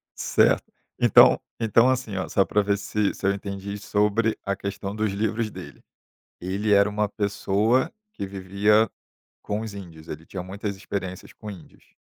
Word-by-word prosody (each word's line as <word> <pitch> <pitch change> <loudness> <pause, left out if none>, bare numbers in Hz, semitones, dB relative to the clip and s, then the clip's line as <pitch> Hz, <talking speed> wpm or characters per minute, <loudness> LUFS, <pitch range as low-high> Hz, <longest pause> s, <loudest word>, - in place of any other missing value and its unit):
Certo. - - +2 0.3
Então - - +7 0.2
então, 115 +3 +4
assim, 125 -6 -1
ó, 95 - -3
só 95 - +3
pra 105 - +2
ver 100 0 +1
se 105 0 -1
se - - -7
eu 100 - +3
entendi 100 0 -5
sobre 105 +2 +1
a 100 - 0
questão 100 +1 -5
dos 110 -1 0
livros 110 +2 -1
dele. - - -10 0.6
Ele 100 +4 -1
era 100 +1 +5
uma 105 0 0
pessoa 105 - +1 0.2
que 100 - -4
vivia 100 +3 +2 0.5
com 105 +1 -3
os 110 -2 -6
índios. 85 -5 -10
Ele 80 +2 -7
tinha 90 0 -6
muitas 100 +2 -5
experiências 95 -1 -6
com 105 - -9
índios. 95 -6 -13
100 Hz, 165 wpm, -25 LUFS, 100-105 Hz, 0.6 s, Então